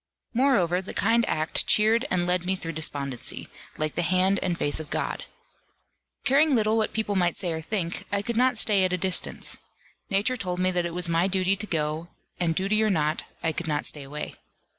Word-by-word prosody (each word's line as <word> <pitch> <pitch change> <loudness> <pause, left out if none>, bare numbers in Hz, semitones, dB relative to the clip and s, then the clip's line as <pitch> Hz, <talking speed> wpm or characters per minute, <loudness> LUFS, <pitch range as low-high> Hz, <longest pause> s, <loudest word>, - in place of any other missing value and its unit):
Moreover 205 -9 +2
the 190 - -8
kind 230 +3 +3
act 155 +1 +1
cheered 220 +4 +3
and 175 -1 +1
led 180 0 +1
me 190 +1 +1
through 165 -3 -4
despondency, 140 -5 -3 0.3
like 155 -1 -1
the 175 - -1
hand 185 +3 +2
and 175 -2 -1
face 145 - +1
of 155 -2 -7
God. - - -3 1.0
Caring 280 +2 +4
little 215 -1 +2
what 220 -1 +1
people 220 -2 -1
might 175 -2 +1
say 175 -3 -2
or 160 - -4
think, 170 0 -2
I 200 0 0
could 235 +2 -3
not 250 +1 +3
stay 205 -3 +4
at 185 -1 +1
a - - +1
distance. 185 0 -1 0.5
Nature 205 +6 +1
told 180 -5 -3
me 185 0 +2
that 175 -1 0
it 170 - -7
was 180 -1 +1
my 170 +2 +2
duty 190 0 +2
to 205 +2 -4
go, 155 0 -1 0.3
and 165 -2 +1
duty 200 +4 +1
or 215 - +3
not, 155 -5 0 0.2
I 165 - +2
could 165 +2 -5
not 150 -1 -1
stay 150 - -2
away. 145 +2 -6
185 Hz, 205 wpm, -26 LUFS, 165-210 Hz, 1.0 s, Caring